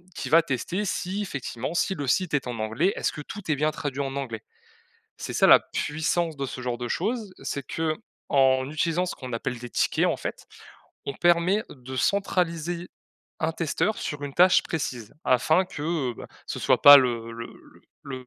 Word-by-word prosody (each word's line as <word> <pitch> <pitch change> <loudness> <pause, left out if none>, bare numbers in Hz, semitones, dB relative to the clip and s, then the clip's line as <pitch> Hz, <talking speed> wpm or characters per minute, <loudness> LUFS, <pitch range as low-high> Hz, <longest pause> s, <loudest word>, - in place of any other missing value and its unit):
qui - - -4
va 165 +1 +7
tester 170 - -2
si, 190 +2 -2
effectivement, 140 - -4
si 190 +2 0
le 145 - -4
site 175 +7 +1
est 140 -4 0
en 120 -2 -4
anglais, 115 - +1
est-ce - - -1
que 150 - -7
tout 195 +3 -9
est 150 - +3
bien 150 +2 +1
traduit 145 -3 -4
en 135 -1 -3
anglais? 115 -5 -5 0.7
C'est - - -6
ça - - +4
la - - +10
puissance 160 +1 -1
de 140 - -3
ce 130 - -7
genre 125 -1 -3
de 120 - -4
choses, 210 - -2
c'est 140 - -4
qu'en 140 - 0
utilisant 165 +4 0
ce - - -5
qu'on 130 -2 -8
appelle 125 +2 -3
des 120 0 -8
tickets, - - +1
en - - +1
fait, - - -6 0.6
on 140 - -3
permet 175 +6 +3
de 130 -1 -9
centraliser 175 +1 0 0.5
un 160 - +1
testeur 165 +6 -1
sur 145 -1 -4
une 140 - -7
tâche 185 +1 +6
précise, 125 -9 -4
afin 155 +9 +3
que, 150 -6 -2
bah, - - -10 0.2
ce - - -5
soit - - +3
pas 145 0 +12
le 115 -3 -1
le 115 0 -6 0.6
le 130 -2 -7
150 Hz, 185 wpm, -26 LUFS, 130-175 Hz, 0.7 s, pas